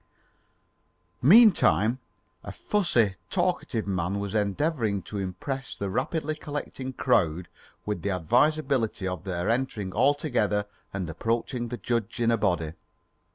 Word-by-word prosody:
Meantime, 145 - +6 0.4
a - - -6
fussy, 125 - +1 0.2
talkative 135 -11 -1
man 95 0 -1
was 100 0 -4
endeavouring 110 - 0
to 105 - -6
impress 130 +8 -4
the 100 -1 -4
rapidly 155 - -1
collecting 145 -3 -5
crowd 90 -10 +1 0.4
with 105 -5 -3
the 100 - -2
advisability 120 - +1
of 90 0 -5
their 90 -2 -2
entering 115 -5 -1
all 145 +1 +4
together 105 -8 0 0.3
and 95 -3 -3
approaching 115 +7 -2
the 120 - -5
judge 115 +2 -2
in 115 -1 +3
a 115 - +3
body. 90 -7 0
115 Hz, 125 wpm, -27 LUFS, 95-135 Hz, 0.4 s, Meantime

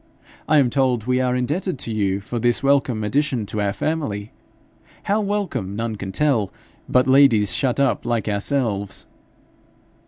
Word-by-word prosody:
'I 155 - +4
am 135 -4 +4
told 130 -5 +1
we 125 0 +1
are 125 -1 +1
indebted 150 +8 -1
to 115 - -3
you 100 -2 0
for 115 +4 -4
this 120 +3 +1
welcome 135 -5 +2
addition 130 0 0
to 105 +1 -3
our 100 -1 0
family 110 -7 -3 0.7
how 210 +2 +1
welcome 190 - -2
none 115 0 -3
can 100 -2 -6
tell 115 -6 +1 0.4
but 125 0 +3
ladies 130 -6 +4
shut 130 -1 0
up 140 -2 +1
like 120 -2 -1
ourselves.' 105 -2 -1
125 Hz, 155 wpm, -21 LUFS, 105-140 Hz, 0.7 s, I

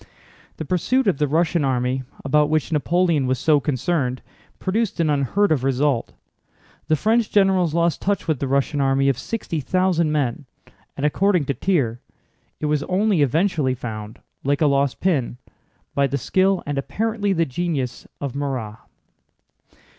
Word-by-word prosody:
The 160 - -5
pursuit 240 - +1
of 190 -9 +1
the 150 - +2
Russian 160 +2 +1
army, 130 -1 0 0.2
about 150 +2 +3
which 155 0 0
Napoleon 160 -2 +1
was 130 0 +1
so 155 0 +3
concerned, 130 -1 -1 0.3
produced 210 +1 -1
an 160 -2 +2
unheard 145 - +1
of 140 -5 +1
result. 135 -1 0 0.7
The 155 - +3
French 220 +6 +1
generals 190 -5 +2
lost 170 -2 +1
touch 200 -2 -1
with 155 -5 0
the 140 - -2
Russian 140 +2 0
army 135 0 +2
of 135 - 0
sixty 200 -8 -4
thousand 175 0 +1
men, 140 -2 -1 0.5
and 140 - -1
according 180 +1 +2
to 140 - -1
Thiers 135 -10 0 0.6
it - - -3
was 150 -1 +1
only 195 -2 +1
eventually 150 -1 +1
found, 110 -3 -7 0.3
like 140 +2 0
a - - +5
lost 140 -1 +1
pin, 140 -10 0 0.6
by 140 0 +2
the 140 +1 -2
skill—and 185 -1 +1
apparently 215 +6 -1
the 165 -3 +2
genius—of 140 -3 -4
Murat. 130 -6 -4
150 Hz, 150 wpm, -22 LUFS, 135-180 Hz, 0.7 s, a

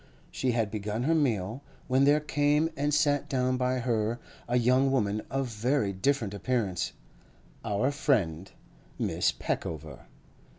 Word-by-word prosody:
She 130 -2 0
had 115 -3 0
begun 105 +2 -3
her 160 +5 +2
meal, 120 - 0 0.3
when 130 +1 +3
there 145 +2 +5
came 150 +1 +1
and 145 +1 0
sat 145 -1 +2
down 130 -1 +1
by 125 0 0
her 115 -2 0 0.3
a 120 +1 +2
young 130 +3 +3
woman 110 -5 +1
of 135 0 -1
very 115 -1 0
different 115 0 0
appearance—our 100 - -3
friend, 100 - 0 0.5
Miss - - +1
Peckover. 80 -1 -5
125 Hz, 130 wpm, -29 LUFS, 105-140 Hz, 0.5 s, there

